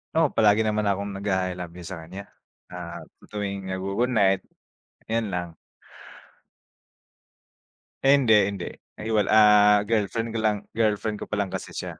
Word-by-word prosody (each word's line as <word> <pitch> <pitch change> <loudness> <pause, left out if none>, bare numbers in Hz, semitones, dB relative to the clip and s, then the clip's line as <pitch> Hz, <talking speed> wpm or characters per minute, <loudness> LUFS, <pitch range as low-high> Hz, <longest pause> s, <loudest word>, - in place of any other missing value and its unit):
Oo, 160 -1 +4
palagi 110 0 +4
naman 105 -1 0
na 100 - +1
'kong 100 0 -5
nag-a-I 95 -2 -1
love 90 -1 -7
you 90 - -9
sa 90 -2 -7
kanya. 95 +5 -9 0.5
Ah, 85 -1 -7 0.2
sa - - -16
tuwing 100 -2 -4
nag-gu-good 100 +6 -1
night, 100 -6 +3 0.7
ayun 110 -2 -1
lang. 90 -2 -4 2.5
Eh, 135 +1 +6
hindi, 130 -5 +2 0.2
hindi, 100 -3 -4 0.3
ay, 110 +1 -5
wal 105 -3 +2
ah, 105 -1 +6
girlfriend 115 +1 -1
ko 115 - -3
lang, 110 -1 +1
girlfriend 110 -1 0
ko - - -7
pa - - -3
lang 100 -2 -2
kasi - - -6
siya. - - -6
105 Hz, 160 wpm, -25 LUFS, 95-110 Hz, 2.5 s, Eh